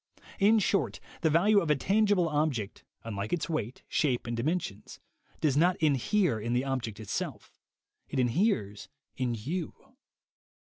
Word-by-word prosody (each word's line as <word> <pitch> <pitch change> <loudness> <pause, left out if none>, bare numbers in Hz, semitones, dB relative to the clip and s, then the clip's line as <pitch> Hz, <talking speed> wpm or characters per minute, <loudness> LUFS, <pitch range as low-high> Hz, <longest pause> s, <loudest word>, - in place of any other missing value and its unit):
In 215 +3 +5
short, 205 -1 +1 0.2
the 160 - +3
value 200 +7 +4
of 170 - -2
a 150 - +5
tangible 200 +3 +2
object, 145 -9 -1 0.2
unlike 105 -2 -4
its 175 -3 -1
weight, 135 -7 -3
shape 130 -5 0
and 120 0 -3
dimensions, 120 - -3 0.4
does 145 -4 +2
not 175 +5 +3
inhere 155 - +2
in 115 +3 -2
the 125 +2 +1
object 120 -6 -3
itself; 110 - -5 0.6
it - - -4
inheres 120 - 0 0.3
in 125 -2 -1
you. 155 - -4
145 Hz, 140 wpm, -29 LUFS, 115-180 Hz, 0.6 s, In